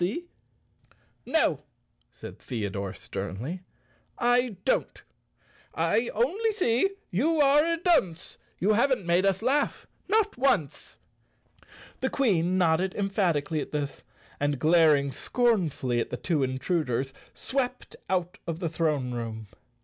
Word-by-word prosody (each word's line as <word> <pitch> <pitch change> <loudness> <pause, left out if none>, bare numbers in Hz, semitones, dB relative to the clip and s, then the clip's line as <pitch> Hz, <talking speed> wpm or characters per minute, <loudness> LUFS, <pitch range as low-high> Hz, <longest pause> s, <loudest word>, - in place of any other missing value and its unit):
90 180 +4 +1
Chapter 345 0 -6
Seven - - -41 1.2
"No," - - -8 0.5
said - - -11
Theodore, 100 -5 -4
sternly, 130 - -5 0.6
"I 245 -2 +2
don't, - - 0 0.4
" - - -33 0.2
I 235 +1 +1
only 375 - +1
see 360 - +2 0.2
you 305 - +1
are 290 +1 +5
a 335 +1 0
dunce; 305 - 0 0.2
You 205 +4 +2
haven't 240 -2 +2
made 175 +3 +3
us 195 +2 0
laugh, 280 +4 +1 0.2
not 425 - +1
once! 205 - 0 0.4
" - - -23
The 265 - +1
Queen 185 -9 +1
nodded 180 +1 +2
emphatically 175 -7 0
at - - -6
this 145 -2 -3 0.4
and, 145 0 0
glaring 155 -2 +4
scornfully 170 - 0
at - - -2
the - - -4
two 165 -5 0
intruders, 135 -1 -1 0.2
swept 255 -2 -3
out 180 -1 -1
of 165 -1 -3
the 170 -3 -2
throne 150 -6 -1
room. 110 -3 -5
180 Hz, 135 wpm, -27 LUFS, -, 1.2 s, are